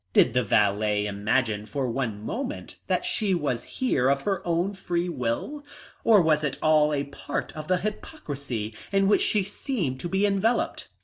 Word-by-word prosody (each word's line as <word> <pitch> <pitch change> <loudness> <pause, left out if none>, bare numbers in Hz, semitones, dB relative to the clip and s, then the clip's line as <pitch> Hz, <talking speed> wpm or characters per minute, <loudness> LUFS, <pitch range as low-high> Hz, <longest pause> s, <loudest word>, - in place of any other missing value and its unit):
Did - - +5
the 125 - +3
valet 105 -1 +2
imagine 105 +1 0
for 135 0 -2
one 115 -4 -2
moment 260 - -5
that - - 0
she 205 -5 +1
was 140 -8 -1
here 135 - +1
of 140 0 +1
her 195 -2 0
own 175 +4 +1
free 175 -2 -2
will? 165 - -3 0.4
Or 215 -5 +6
was 155 -1 +3
it 140 -3 -1
all 155 -1 +4
a 140 -1 0
part 140 0 -5
of 155 -1 -6
the 185 - +3
hypocrisy 140 - -5 0.2
in 195 -1 +3
which 205 - +4
she 210 -2 +2
seemed 190 - -3
to 175 - -4
be 190 +2 +2
enveloped? 205 +4 +1
150 Hz, 175 wpm, -26 LUFS, 125-195 Hz, 0.4 s, Or